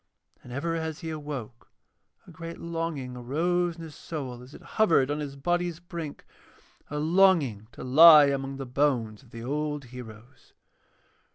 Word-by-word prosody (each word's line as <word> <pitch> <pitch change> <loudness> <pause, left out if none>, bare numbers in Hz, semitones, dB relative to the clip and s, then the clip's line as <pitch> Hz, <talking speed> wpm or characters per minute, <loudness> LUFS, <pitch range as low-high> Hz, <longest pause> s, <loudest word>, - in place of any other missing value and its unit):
And 125 - -13
ever 145 +6 -2
as 160 +1 -4
he 165 -1 -4
awoke 140 -7 -7 0.6
a 180 - -14
great 165 +1 -8
longing 165 -6 -4
arose 170 +8 0
in 165 - -10
his 160 -2 -9
soul 130 -8 -6
as 125 +3 -13
it - - -13
hovered 165 -11 +2
on 150 - -2
his 145 -2 -5
body's 175 +3 -1
brink, 170 -4 -7 0.6
a 150 - -4
longing 155 - +3
to - - -9
lie 150 +3 +9
among 135 -1 -2
the 135 - -5
bones 125 -5 0
of 130 - -21
the 115 0 -9
old 150 +1 -3
heroes. 120 0 -12
150 Hz, 160 wpm, -27 LUFS, 130-165 Hz, 0.6 s, lie